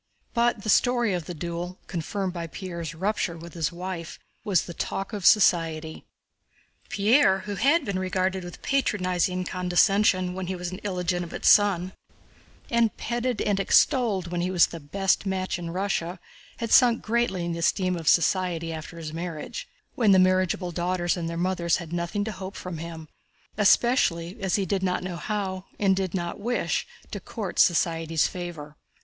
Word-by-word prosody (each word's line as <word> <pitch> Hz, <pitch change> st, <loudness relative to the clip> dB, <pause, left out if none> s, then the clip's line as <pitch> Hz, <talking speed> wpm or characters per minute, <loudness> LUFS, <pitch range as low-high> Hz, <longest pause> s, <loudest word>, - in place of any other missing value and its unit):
But 235 Hz, -3 st, +1 dB
the 215 Hz, -, -3 dB
story 240 Hz, -1 st, +3 dB
of 175 Hz, -3 st, -3 dB
the 175 Hz, -, -5 dB
duel, 175 Hz, +2 st, -5 dB
confirmed 185 Hz, +2 st, -3 dB
by 170 Hz, -2 st, -4 dB
Pierre's 170 Hz, -3 st, -6 dB
rupture 190 Hz, -1 st, -1 dB
with 170 Hz, +1 st, -10 dB
his 165 Hz, -2 st, -1 dB
wife, 175 Hz, -1 st, -6 dB, 0.3 s
was 195 Hz, -4 st, +2 dB
the 170 Hz, -, -8 dB
talk 195 Hz, +5 st, -4 dB
of 200 Hz, -4 st, +1 dB
society. 165 Hz, -5 st, +3 dB, 0.8 s
Pierre 220 Hz, -2 st, +4 dB
who 205 Hz, -, -5 dB
had 285 Hz, +8 st, +2 dB
been 195 Hz, -3 st, -2 dB
regarded 185 Hz, 0 st, -1 dB
with 175 Hz, -1 st, -10 dB
patronizing 185 Hz, -8 st, 0 dB
condescension 185 Hz, +1 st, +2 dB
when 185 Hz, -1 st, -5 dB
he 190 Hz, -, -2 dB
was 180 Hz, 0 st, -5 dB
an 185 Hz, -, -6 dB
illegitimate 180 Hz, -3 st, -3 dB
son, 190 Hz, -3 st, +4 dB, 0.8 s
and 235 Hz, -2 st, +2 dB
petted 240 Hz, -1 st, -2 dB
and 205 Hz, -2 st, +1 dB
extolled 200 Hz, -, +2 dB
when 175 Hz, -1 st, -1 dB
he 180 Hz, -, -1 dB
was 180 Hz, -2 st, +5 dB
the 165 Hz, -, -8 dB
best 195 Hz, +7 st, 0 dB
match 185 Hz, -2 st, -2 dB
in 170 Hz, -1 st, -5 dB
Russia, 180 Hz, -1 st, -2 dB, 0.4 s
had 230 Hz, -2 st, -4 dB
sunk 240 Hz, -3 st, +5 dB
greatly 220 Hz, -6 st, 0 dB
in 170 Hz, -, -2 dB
the 170 Hz, -, -4 dB
esteem 185 Hz, +2 st, +1 dB
of 165 Hz, -3 st, -6 dB
society 170 Hz, -1 st, +2 dB
after 160 Hz, +1 st, -8 dB
his 155 Hz, -2 st, -6 dB
marriage—when 180 Hz, -, -2 dB
the -, -, +6 dB
marriageable 185 Hz, -1 st, +2 dB
daughters 175 Hz, 0 st, 0 dB
and 170 Hz, -2 st, -3 dB
their 165 Hz, -, -4 dB
mothers 175 Hz, -1 st, +1 dB
had 170 Hz, -2 st, -8 dB
nothing 175 Hz, +4 st, -1 dB
to 220 Hz, -, -3 dB
hope 190 Hz, 0 st, -7 dB
from 180 Hz, -3 st, -6 dB
him—especially 170 Hz, -, 0 dB
as 190 Hz, -2 st, +1 dB
he 200 Hz, -, 0 dB
did 190 Hz, +1 st, -1 dB
not 180 Hz, -1 st, -1 dB
know 180 Hz, -2 st, -4 dB
how, 190 Hz, -1 st, -3 dB
and 195 Hz, -2 st, +3 dB
did 190 Hz, -1 st, -2 dB
not 175 Hz, -2 st, -3 dB
wish, 240 Hz, +4 st, -1 dB, 0.2 s
to -, -, -4 dB
court 205 Hz, -6 st, -5 dB
society's 165 Hz, -2 st, +3 dB
favor. 165 Hz, -5 st, -6 dB
185 Hz, 165 wpm, -26 LUFS, 170-200 Hz, 0.8 s, the